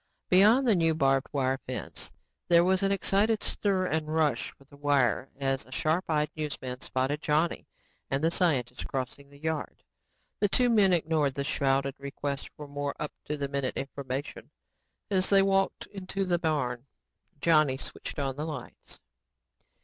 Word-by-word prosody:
Beyond 215 Hz, +8 st, +6 dB
the 225 Hz, -, +6 dB
new 165 Hz, -3 st, +2 dB
barbed 135 Hz, -3 st, +2 dB
wire 135 Hz, -2 st, 0 dB
fence, 130 Hz, -, -5 dB, 0.4 s
there 170 Hz, 0 st, +6 dB
was 185 Hz, +1 st, +2 dB
an 195 Hz, 0 st, +2 dB
excited 200 Hz, +3 st, +2 dB
stir 195 Hz, -3 st, 0 dB
and 155 Hz, -3 st, -1 dB
rush 155 Hz, -6 st, +1 dB
for -, -, -19 dB
the 140 Hz, +1 st, -18 dB
wire 140 Hz, -4 st, +1 dB
as 135 Hz, -1 st, 0 dB
a 130 Hz, -, -19 dB
sharp 155 Hz, +6 st, 0 dB
eyed 150 Hz, -1 st, +1 dB
newsman 140 Hz, -5 st, -4 dB
spotted 135 Hz, +3 st, -1 dB
Johnny 155 Hz, +3 st, 0 dB, 0.4 s
and 135 Hz, +2 st, -1 dB
the 165 Hz, -, +3 dB
scientist 130 Hz, -9 st, 0 dB
crossing 135 Hz, +1 st, -5 dB
the 140 Hz, -, -16 dB
yard. 160 Hz, 0 st, -4 dB, 0.6 s
The 205 Hz, -, +3 dB
two 245 Hz, +4 st, +3 dB
men 205 Hz, -4 st, +5 dB
ignored 155 Hz, -5 st, +1 dB
the 140 Hz, -, -1 dB
shouted 140 Hz, -2 st, +1 dB
requests 140 Hz, 0 st, -4 dB
for 150 Hz, -, -8 dB
more 145 Hz, 0 st, -3 dB
up 150 Hz, -, -4 dB
to 150 Hz, -, -3 dB
the 140 Hz, -1 st, -2 dB
minute 140 Hz, -2 st, -2 dB
information 135 Hz, 0 st, -5 dB, 0.6 s
as 190 Hz, -1 st, +2 dB
they 195 Hz, -1 st, +6 dB
walked 195 Hz, 0 st, +1 dB
into 195 Hz, 0 st, -4 dB
the 175 Hz, -2 st, +1 dB
barn. 140 Hz, -6 st, -1 dB, 0.5 s
Johnny 155 Hz, -4 st, +4 dB
switched -, -, -6 dB
on 135 Hz, -2 st, -1 dB
the 150 Hz, -, -2 dB
lights. 150 Hz, -6 st, -8 dB
150 Hz, 165 wpm, -29 LUFS, 135-175 Hz, 0.6 s, Beyond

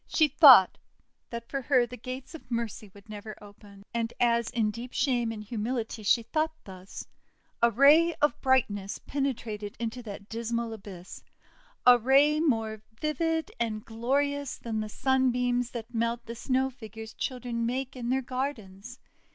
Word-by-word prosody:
She 310 Hz, -, +3 dB
thought 265 Hz, -, +8 dB, 0.5 s
that 235 Hz, 0 st, -6 dB
for 275 Hz, -, -3 dB
her 255 Hz, -2 st, +3 dB
the 245 Hz, +1 st, -9 dB
gates 255 Hz, +4 st, -8 dB
of 320 Hz, -, -11 dB
Mercy 230 Hz, -3 st, -4 dB
would 200 Hz, +3 st, -17 dB
never 215 Hz, 0 st, -8 dB
open. 205 Hz, -1 st, -15 dB
And, 230 Hz, 0 st, -1 dB
as 235 Hz, -1 st, +2 dB
in 225 Hz, -3 st, 0 dB
deep 240 Hz, +3 st, -8 dB
shame 240 Hz, -5 st, +1 dB
and 215 Hz, -1 st, -7 dB
humility 225 Hz, +1 st, -3 dB
she 230 Hz, +3 st, +3 dB
thought 315 Hz, +6 st, -1 dB
thus, 185 Hz, -1 st, -10 dB, 0.6 s
a 235 Hz, -, +6 dB
ray 295 Hz, +8 st, +5 dB
of 295 Hz, 0 st, 0 dB
brightness 205 Hz, -7 st, +1 dB
penetrated 230 Hz, -7 st, -4 dB
into 235 Hz, +1 st, -4 dB
that 205 Hz, -3 st, -9 dB
dismal 230 Hz, 0 st, -3 dB
abyss, 195 Hz, -4 st, -10 dB, 0.6 s
a 250 Hz, -1 st, +8 dB
ray 280 Hz, +5 st, +4 dB
more 225 Hz, -8 st, 0 dB, 0.2 s
vivid 320 Hz, +1 st, -1 dB
and 215 Hz, -2 st, -2 dB
glorious 280 Hz, +5 st, -1 dB
than 225 Hz, -2 st, -4 dB
the 215 Hz, 0 st, -4 dB
Sunbeams 250 Hz, -1 st, +1 dB
that 235 Hz, 0 st, -8 dB
melt 235 Hz, +1 st, -1 dB
the 230 Hz, -, -6 dB
Snow 260 Hz, +2 st, 0 dB
Figures 220 Hz, -2 st, -10 dB
children 240 Hz, -2 st, -3 dB
make 265 Hz, +2 st, -3 dB
in 240 Hz, -2 st, -4 dB
their 265 Hz, +1 st, +1 dB
gardens. 245 Hz, -5 st, -5 dB
235 Hz, 155 wpm, -28 LUFS, 220-265 Hz, 0.6 s, thought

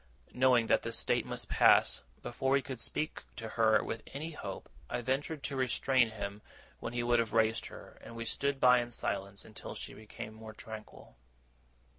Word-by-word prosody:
Knowing 125 Hz, -2 st, +4 dB
that -, -, +3 dB
this 115 Hz, 0 st, -1 dB
state -, -, +1 dB
must -, -, -4 dB
pass, -, -, +5 dB, 0.2 s
before 135 Hz, 0 st, 0 dB
we 140 Hz, -, +4 dB
could 130 Hz, -3 st, -6 dB
speak 155 Hz, +6 st, -1 dB
to 115 Hz, -2 st, -6 dB
her 110 Hz, -1 st, +4 dB
with 115 Hz, -, -4 dB
any 155 Hz, +4 st, -4 dB
hope, 100 Hz, -11 st, -6 dB, 0.2 s
I -, -, -2 dB
ventured 140 Hz, +4 st, -1 dB
to 140 Hz, -, -2 dB
restrain 130 Hz, -1 st, +2 dB
him 105 Hz, -1 st, -5 dB, 0.4 s
when 115 Hz, -, -5 dB
he 120 Hz, 0 st, 0 dB
would 120 Hz, 0 st, +3 dB
have 115 Hz, -2 st, -1 dB
raised 110 Hz, 0 st, +2 dB
her, -, -, -12 dB
and 115 Hz, -, -10 dB
we 115 Hz, 0 st, -4 dB
stood 140 Hz, +4 st, -1 dB
by 125 Hz, -1 st, +7 dB
in 120 Hz, 0 st, -3 dB
silence 100 Hz, -4 st, -3 dB
until 110 Hz, -, -8 dB
she -, -, -7 dB
became 110 Hz, 0 st, -8 dB
more 110 Hz, 0 st, -10 dB
tranquil. 110 Hz, -, -10 dB
115 Hz, 185 wpm, -33 LUFS, 110-130 Hz, 0.4 s, by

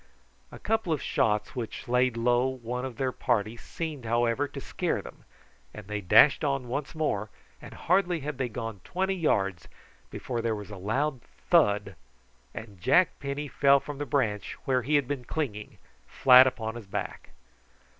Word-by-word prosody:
A -, -, -9 dB
couple 220 Hz, -4 st, -1 dB
of 155 Hz, -, +1 dB
shots 105 Hz, -4 st, 0 dB
which 120 Hz, 0 st, -6 dB
laid 125 Hz, 0 st, +2 dB
low 120 Hz, +2 st, +2 dB
one 125 Hz, -1 st, -4 dB
of 125 Hz, -4 st, -7 dB
their 130 Hz, -1 st, 0 dB
party 115 Hz, -4 st, -1 dB
seemed, 150 Hz, +2 st, -6 dB
however, 120 Hz, +4 st, +1 dB
to -, -, -8 dB
scare -, -, -2 dB
them, -, -, -12 dB, 0.5 s
and 105 Hz, -, -9 dB
they 105 Hz, +1 st, -4 dB
dashed 120 Hz, -, +6 dB
on 140 Hz, -3 st, -1 dB
once 140 Hz, +5 st, -4 dB
more, 110 Hz, -10 st, -1 dB, 0.3 s
and -, -, -11 dB
hardly 180 Hz, -2 st, +1 dB
had 145 Hz, -1 st, -5 dB
they 130 Hz, -2 st, -1 dB
gone 115 Hz, -4 st, -6 dB
twenty 190 Hz, +1 st, -1 dB
yards 100 Hz, -, 0 dB, 0.4 s
before 120 Hz, -2 st, -4 dB
there 115 Hz, -1 st, -1 dB
was 105 Hz, 0 st, -8 dB
a -, -, -6 dB
loud 130 Hz, +8 st, -1 dB, 0.3 s
thud 105 Hz, 0 st, +3 dB, 0.6 s
and 105 Hz, -5 st, -10 dB
Jack 180 Hz, -, +3 dB
Penny 140 Hz, +1 st, -4 dB
fell 140 Hz, +1 st, +4 dB
from 145 Hz, 0 st, -8 dB
the 145 Hz, -, -3 dB
branch, 105 Hz, -7 st, -1 dB
where 130 Hz, -1 st, +2 dB
he 145 Hz, +5 st, 0 dB
had 140 Hz, -3 st, +2 dB
been 140 Hz, -3 st, -3 dB
clinging, 115 Hz, -7 st, -4 dB, 0.3 s
flat 130 Hz, 0 st, +7 dB
upon 110 Hz, -3 st, -3 dB
his 115 Hz, -3 st, -10 dB
back. -, -, -5 dB
125 Hz, 170 wpm, -28 LUFS, 110-145 Hz, 0.6 s, flat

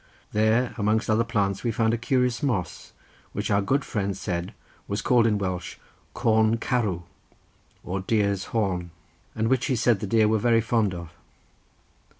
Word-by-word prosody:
There, 110 Hz, +3 st, +2 dB
amongst 110 Hz, +1 st, +1 dB
other 110 Hz, +2 st, +3 dB
plants, 100 Hz, -4 st, -1 dB
we 120 Hz, -, 0 dB
found 115 Hz, 0 st, +1 dB
a -, -, +1 dB
curious 125 Hz, -2 st, +1 dB
moss 115 Hz, -, -2 dB, 0.4 s
which -, -, -2 dB
our 100 Hz, 0 st, +3 dB
good 135 Hz, +8 st, 0 dB
friend 100 Hz, -3 st, -2 dB
said 90 Hz, -2 st, -4 dB, 0.3 s
was 100 Hz, +1 st, -2 dB
called 120 Hz, -3 st, +4 dB
in 105 Hz, -2 st, +2 dB
Welsh 90 Hz, -3 st, -3 dB, 0.4 s
Corn 110 Hz, 0 st, +3 dB
Carw, 105 Hz, -8 st, -1 dB, 0.8 s
or 95 Hz, +2 st, -3 dB
deer's 100 Hz, -1 st, 0 dB
horn, 95 Hz, -6 st, -1 dB, 0.5 s
and 110 Hz, 0 st, 0 dB
which 130 Hz, 0 st, +1 dB
he 130 Hz, -, +1 dB
said 115 Hz, -2 st, +2 dB
the 105 Hz, -, -4 dB
deer 110 Hz, +1 st, +3 dB
were 110 Hz, 0 st, +2 dB
very 115 Hz, +1 st, +3 dB
fond 110 Hz, -4 st, +1 dB
of. 85 Hz, -2 st, -8 dB
110 Hz, 160 wpm, -25 LUFS, 100-115 Hz, 0.8 s, called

